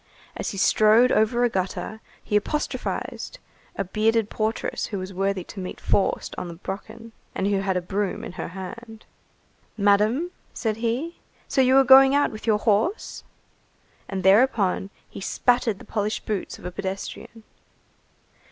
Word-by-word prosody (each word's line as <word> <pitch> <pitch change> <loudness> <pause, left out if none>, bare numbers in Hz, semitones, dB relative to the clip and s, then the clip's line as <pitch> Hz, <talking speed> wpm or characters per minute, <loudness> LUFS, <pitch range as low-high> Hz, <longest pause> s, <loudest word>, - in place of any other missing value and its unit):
As - - -3
he 195 - -6
strode 215 +4 +5
over 220 +3 +3
a 245 - +4
gutter, 195 +2 -3 0.2
he 210 - -2
apostrophized 300 - -2 0.4
a - - -1
bearded 220 +3 +1
portress 220 +1 -2
who 205 - -4
was 185 +1 -6
worthy 195 0 -1
to 195 - -10
meet 185 -1 -6
Faust 195 - 0
on - - -5
the 170 - -8
Brocken, 200 +6 -8 0.2
and 190 - -1
who 200 -1 +2
had 195 -1 0
a 180 - -2
broom 200 +1 -2
in - - -6
her - - -5
hand. 220 +5 -9 0.7
"Madam," 215 - +3 0.2
said 220 -3 -1
he, 240 +9 -2 0.3
"so 270 - +2
you 260 +1 +5
are 270 - +7
going 270 +1 +8
out 285 - +3
with 215 +1 -9
your 215 -2 +4
horse?" 220 - 0 0.9
And 190 -2 -3
thereupon, 195 -2 +3 0.2
he - - -10
spattered 240 0 +1
the - - -13
polished 210 0 -2
boots 210 -3 -3
of - - -14
a 180 - -4
pedestrian. 195 +4 -6
215 Hz, 160 wpm, -24 LUFS, 195-235 Hz, 0.9 s, going